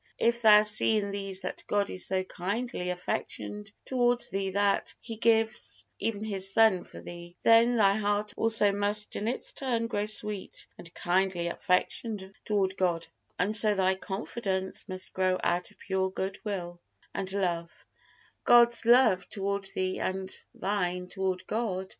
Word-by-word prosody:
If 235 0 +1
thou 210 -2 +7
see 215 +1 +6
in 200 -1 -2
these 195 -1 -3
that 185 - -5
God 205 -1 0
is 185 - -3
so 190 0 0
kindly 190 +1 -4
affectioned 200 +3 -4
toward 245 -2 +2
thee 195 0 -2
that 200 +1 +1
He 230 -1 -8
gives 225 0 +2
even 215 0 -2
His 195 -3 0
Son 220 -4 +4
for - - -12
thee, 175 0 -11
then 230 +2 +5
thy 200 -3 +5
heart 205 0 -1
also 225 -2 +3
must 205 +1 -1
in 210 - -3
its 245 - -3
turn 240 -4 -2
grow 210 -2 -2
sweet 210 -2 0
and 170 - -11
kindly 175 -1 0
affectioned 190 +2 -2
toward 195 -2 0
God, 175 -3 0 0.3
and 205 +4 0
so 210 0 +3
thy 190 -1 +2
confidence 190 0 -4
must 185 0 -4
grow 185 0 +1
out 175 +1 0
of - - -22
pure 190 -1 -1
good 190 +1 -4
will 175 -4 -5 0.3
and 190 -1 -4
love 175 -4 -3 0.6
God's 235 -1 +5
love 240 -6 +4
toward 200 0 -3
thee 185 0 -2
and 190 0 -2 0.2
thine 180 -2 -2
toward 190 -1 -3
God. 195 -4 -3
200 Hz, 155 wpm, -28 LUFS, 185-215 Hz, 0.6 s, thou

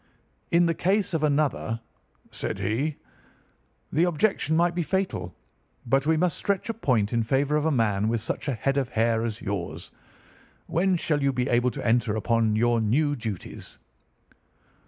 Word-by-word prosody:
"'In 170 +1 +4
the 165 - +2
case 190 +3 +1
of 160 -2 0
another,' 145 -6 0 0.5
said - - -4
he, 115 +10 -1 1.0
'the 160 - +2
objection 170 -2 +1
might 175 +1 +3
be 175 - -1
fatal, 175 - -2 0.5
but 135 +4 +1
we 160 0 +3
must 175 +1 0
stretch 200 +2 -1
a - - 0
point 120 - 0
in 115 - +2
favour 135 +6 +1
of 150 0 +1
a - - +2
man 110 -6 +1
with 115 +1 +1
such 110 - -4
a 135 - 0
head 135 +5 -1
of 135 -3 0
hair 115 0 +1
as 110 -2 -4
yours. 85 -4 -4 0.7
When 185 +2 +1
shall 155 -3 0
you 140 0 +2
be 125 -1 -1
able 120 +1 +3
to - - -6
enter 115 -2 +2
upon 110 -1 +1
your 120 +1 +2
new 145 +7 +2
duties? 110 -7 -7
135 Hz, 170 wpm, -26 LUFS, 115-160 Hz, 1.0 s, In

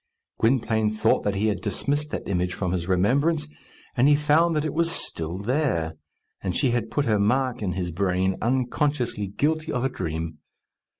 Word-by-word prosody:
Gwynplaine 110 -2 +2
thought 110 0 +2
that 100 -1 +1
he 100 +2 0
had 100 -4 0
dismissed 145 +8 -1
that - - -5
image 90 -2 -1
from 90 -2 -2
his 90 -2 -2
remembrance, 140 - +2 0.5
and 125 +2 +4
he 145 - +6
found 155 +3 +3
that 150 0 0
it 155 - -2
was 165 +1 +2
still 85 - -3
there; 100 - 0 0.5
and 90 -3 -2
she 130 - +2
had 120 -2 -1
put 145 - 0
her 110 -4 +2
mark 125 +4 +1
in 95 -4 -1
his 90 -1 -3
brain, 95 +1 +1
unconsciously 125 -2 0
guilty 155 - -1
of 125 -2 -1
a 135 - +2
dream. 80 -6 -4
110 Hz, 180 wpm, -25 LUFS, 95-145 Hz, 0.5 s, he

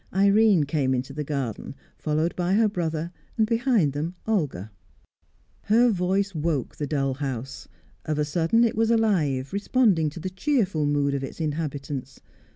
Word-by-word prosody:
Irene 200 -2 +5
came 140 -3 0
into 130 +2 -4
the 150 +1 -3
garden, 135 -6 -4 0.2
followed 155 +3 -1
by 180 +1 0
her 220 +1 +4
brother, 165 -4 -2 0.3
and 220 - +4
behind 230 - +2
them 160 +5 -3
Olga. 145 - -1 0.9
Her 235 +3 +4
voice 195 +1 0
woke 155 -5 -2
the 145 - -3
dull 135 -2 0
house; 135 -2 -5 0.4
of 155 -1 -1
a 150 - +1
sudden 165 +9 +2
it 230 - +1
was 225 +1 +2
alive, 165 - +1
responding 200 -6 +2
to 150 - -9
the 185 +3 -4
cheerful 190 - 0
mood 145 -1 +1
of 140 -1 -2
its 135 - -7
inhabitants. 145 -4 -4
160 Hz, 160 wpm, -25 LUFS, 145-200 Hz, 0.9 s, Irene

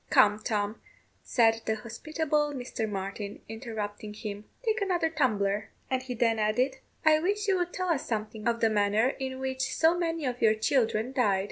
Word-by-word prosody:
"Come, 210 0 +5
Tom," 210 0 -2 0.4
said 225 -2 +3
the 220 - +2
hospitable 295 +6 -1
Mr. 245 -3 -3
Martin, 200 +1 -5
interrupting 215 -2 -5
him, 210 -1 -6 0.2
"take 445 -2 +1
another 350 -4 +1
tumbler;" 210 -9 +1 0.2
and 260 -1 +1
he 255 -1 -5
then 230 -1 +2
added, 245 +6 +1 0.3
"I 310 -1 +6
wish 410 +5 0
you 380 -2 +3
would 355 0 -1
tell 370 0 -2
us 320 -5 0
something 215 0 -3
of 235 0 +1
the 225 - +5
manner 210 +3 +3
in 265 -1 -4
which 260 0 -3
so 325 +1 +4
many 330 -3 -1
of 245 -1 -2
your 220 -1 +5
children 225 +1 +1
died. 210 -7 +3
235 Hz, 175 wpm, -29 LUFS, 215-295 Hz, 0.4 s, I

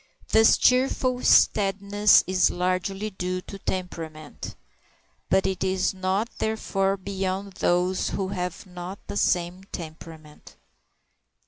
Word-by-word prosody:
This 220 0 +5
cheerful 255 0 +2
steadiness 200 +1 +4
is 185 0 +3
largely 185 +3 -2
due 185 -1 -3
to 195 +2 -10
temperament, 165 -5 -6 0.7
but 190 - +3
it 190 -1 -1
is 190 0 0
not 190 +4 -1
therefore 195 -3 0
beyond 190 0 -3
those 180 +1 +1
who 190 -2 -2
have 180 -1 -4
not 180 +1 -8
the - - -6
same 180 0 0
temperament. 160 -3 -10
190 Hz, 110 wpm, -25 LUFS, 180-200 Hz, 0.7 s, This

